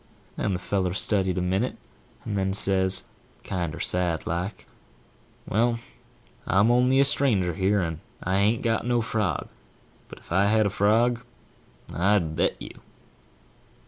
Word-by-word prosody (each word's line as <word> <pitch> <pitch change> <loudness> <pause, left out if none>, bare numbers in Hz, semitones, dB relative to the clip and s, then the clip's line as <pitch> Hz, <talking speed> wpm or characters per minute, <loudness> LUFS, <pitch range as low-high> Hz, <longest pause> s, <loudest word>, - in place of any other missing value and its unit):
div> - - -4
And 100 - 0
the - - -3
feller 95 -1 -1
studied 95 -3 0
a 90 - 0
minute, 95 +7 -1 0.5
and 105 - -3
then 95 -1 0
says, 95 -1 +1 0.4
kinder 85 -4 -3
sad 90 -3 -1
like, 90 +5 -4 0.8
"Well, 115 +3 +1 0.7
I'm 100 +5 +4
only 125 +2 +4
a 140 - +6
stranger 110 -11 +2
here, 100 +3 +1
and 80 -3 -3 0.2
I 95 +2 0
an't 105 +4 +2
got 115 -1 +1
no 120 0 +1
frog; 105 -8 -1 0.6
but - - -11
if - - -18
I 95 +3 +3
had 110 +1 +3
a 100 - 0
frog, 115 +5 +2 0.7
I'd 90 -3 +1
bet 85 - 0
you." - - -10
100 Hz, 145 wpm, -25 LUFS, 90-115 Hz, 0.8 s, a